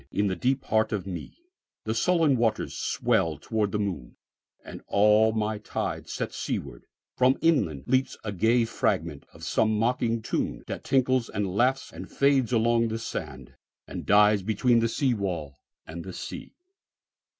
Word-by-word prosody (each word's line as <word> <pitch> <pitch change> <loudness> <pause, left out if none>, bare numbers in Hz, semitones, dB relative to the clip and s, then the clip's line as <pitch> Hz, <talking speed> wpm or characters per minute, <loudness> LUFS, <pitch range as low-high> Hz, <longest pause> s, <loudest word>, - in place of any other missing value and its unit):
In 105 - 0
the 95 -2 0
deep 130 +4 0
heart 110 +1 +1
of 105 -4 -2
meThe 110 - -8
sullen 160 +3 +3
waters 115 -2 0
swell 80 -3 0
towards 105 +5 -1
the 105 - -1
moon, 90 -12 -4 0.5
And - - -9
all 105 +2 +4
my 110 -1 -2
tides 105 - -4
set - - -4
seaward. 65 -4 -5 0.3
From 130 +1 +4
inlandLeaps 130 - +1
a 105 - -3
gay 115 +5 +2
fragment 80 -8 -2
of - - -15
some 110 -1 +1
mocking 115 0 0
tune, - - -2
That - - -6
tinkles 130 -3 +1
and 100 -2 -3
laughs 130 +5 +1
and - - -9
fades 135 -3 +2
along 115 0 +3
the 110 0 -3
sand, 115 - -6 0.3
And - - -6
dies 105 0 +5
between 110 +4 +2
the 115 0 +1
seawall 95 - -2 0.3
and 85 +1 -7
the 95 - -8
sea. - - -8
110 Hz, 150 wpm, -27 LUFS, 100-125 Hz, 0.5 s, dies